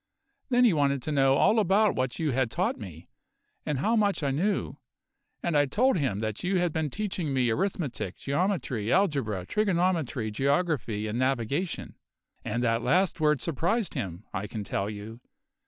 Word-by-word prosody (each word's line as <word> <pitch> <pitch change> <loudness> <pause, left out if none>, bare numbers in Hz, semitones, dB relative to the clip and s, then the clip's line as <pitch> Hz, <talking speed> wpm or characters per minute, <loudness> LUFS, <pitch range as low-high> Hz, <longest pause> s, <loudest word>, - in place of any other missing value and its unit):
Then 245 -1 +4
he 225 - +5
wanted 140 -3 +1
to 155 - -3
know 135 -2 +4
all 220 +10 +4
about 205 +1 +3
what 130 -1 -1
you 155 -3 0
had 130 -1 +1
taught - - 0
me, 85 -6 -10 0.6
and 150 - 0
how 215 - +1
much 205 -6 +1
I 140 - +1
knew; 190 +10 -1 0.7
and 170 - 0
I 145 -1 +4
told 245 - +2
him 135 - 0
that 110 -1 -3
you 185 +1 +1
had 175 -3 +1
been 160 -2 -1
teaching 185 -3 -3
me 125 -3 +2
arithmetic, 145 - -2
geometry, 140 - -1
algebra, 140 - +1
trigonometry, 170 - 0
geography, 135 - 0
and 110 +3 -2
navigation; 135 - -1 0.5
and 120 +3 -2
that 115 -1 +1
last 175 +8 +2
word 150 -3 +2
surprised 175 - 0
him, 90 0 -4
I 105 +1 -3
can 105 +1 -5
tell 100 0 -2
you. 110 +3 -8
140 Hz, 170 wpm, -28 LUFS, 115-180 Hz, 0.7 s, he